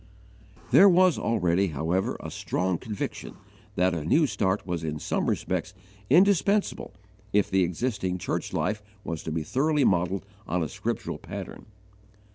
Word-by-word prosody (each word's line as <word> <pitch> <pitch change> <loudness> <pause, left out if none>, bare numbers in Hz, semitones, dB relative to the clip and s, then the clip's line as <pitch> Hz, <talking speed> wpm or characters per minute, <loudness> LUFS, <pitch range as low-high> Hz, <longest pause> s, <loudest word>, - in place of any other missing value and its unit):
There 200 - +8
was 185 -1 +4
already, 95 -4 +1
however, 80 +4 -1
a - - -7
strong 90 -2 -1
conviction 105 -3 -5 0.4
that 90 0 +2
a 80 -3 -3
new 155 - +3
start 100 -5 -1
was 85 -3 -3
in 75 -1 -3
some - - -1
respects - - -2 0.3
indispensable 200 +5 +3 0.4
if 105 -1 +2
the 95 0 +3
existing 95 0 -1
church - - -3
life 105 0 -1 0.2
was 80 -2 -4
to 80 - -5
be 80 0 -2
thoroughly 145 - +1
modelled 90 0 +1 0.2
on 90 -1 0
a 80 - -3
scriptural - - -4
pattern. - - -8
95 Hz, 145 wpm, -27 LUFS, 85-130 Hz, 0.4 s, There